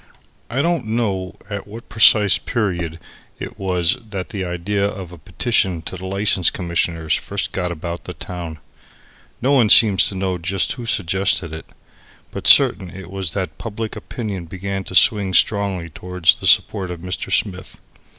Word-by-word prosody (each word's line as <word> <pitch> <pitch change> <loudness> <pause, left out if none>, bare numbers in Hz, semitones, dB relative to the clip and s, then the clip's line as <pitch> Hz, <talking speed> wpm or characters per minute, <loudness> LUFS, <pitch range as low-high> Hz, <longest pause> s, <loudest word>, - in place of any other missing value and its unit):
I 130 +4 -1
don't 170 -9 -1
know 100 -5 -2
at 100 -1 -6
what 115 +3 -11
precise 105 -2 +5
period 90 -8 -3 0.4
it - - -8
was 90 0 +1
that 95 -3 -5
the 100 -2 -4
idea 90 +3 -2
of 95 -3 -4
a 90 - -12
petition 95 -4 0
to - - -6
the 95 +1 -7
License 100 -2 +2
Commissioners 85 -2 -1
first - - -2
got 90 -2 -3
about 85 +1 -6
the - - -8
town. 85 -3 -7 0.9
No 135 - +2
one 125 -6 +4
seemed 105 -3 +6
to 100 - +4
know 95 -1 -2
just 95 +3 -1
who 120 -3 -6
suggested 95 -3 0
it. 80 - -8 0.6
But - - -4
certain 95 - +6
it 95 0 -11
was 95 -4 -4
that 90 -5 -4
public 110 0 -5
opinion 105 -8 -6
began 95 +3 -5
to 95 - -8
swing 100 -3 +4
strongly 100 -5 +1
towards 90 0 +1
the - - -4
support 95 -2 +3
of 85 -2 -7
Mr. 90 +1 -4
Smith. 95 -3 -1
95 Hz, 165 wpm, -20 LUFS, 90-105 Hz, 0.9 s, seemed